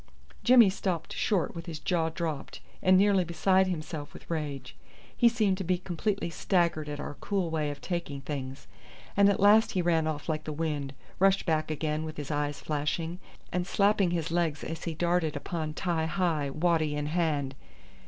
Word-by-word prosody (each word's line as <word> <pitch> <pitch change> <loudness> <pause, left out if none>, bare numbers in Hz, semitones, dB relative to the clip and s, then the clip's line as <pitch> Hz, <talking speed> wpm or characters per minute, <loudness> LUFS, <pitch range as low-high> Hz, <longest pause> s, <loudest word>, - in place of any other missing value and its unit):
Jimmy 240 -5 +7
stopped 185 -4 -3
short 195 -7 0
with 165 0 -8
his 165 -2 -5
jaw 165 -1 0
dropped, 160 -3 -4 0.2
and 185 0 +5
nearly 195 -1 +4
beside 185 +3 +2
himself 155 -4 -5
with - - -11
rage. 150 -4 -4 0.4
He 240 - +5
seemed 210 -5 +1
to - - -2
be 180 0 +1
completely 180 +1 -2
staggered 170 -4 +1
at 145 0 -5
our 145 -1 -6
cool 190 -5 -1
way 155 -2 0
of 145 - -7
taking 170 -6 -3
things, 135 -1 -5 0.5
and 200 0 +6
at 200 - +1
last 210 +3 +5
he 185 - +1
ran 165 -2 +2
off 150 -2 -3
like 155 -1 -2
the 155 - -3
wind, 145 -3 -3 0.2
rushed 195 +1 +4
back 155 -2 0
again 155 0 -1
with 155 0 -6
his 145 0 -5
eyes 145 0 -1
flashing, 160 +3 -2 0.3
and 180 0 -1
slapping 200 -2 +3
his 165 -1 -2
legs 165 -4 0
as 160 -1 -5
he 165 -2 -3
darted 170 -2 +1
upon 155 +1 -4
Ti 170 -3 0
hi, 165 -5 0
waddy 155 0 +1
in 150 0 -2
hand. 150 -4 0
165 Hz, 185 wpm, -29 LUFS, 150-185 Hz, 0.5 s, Jimmy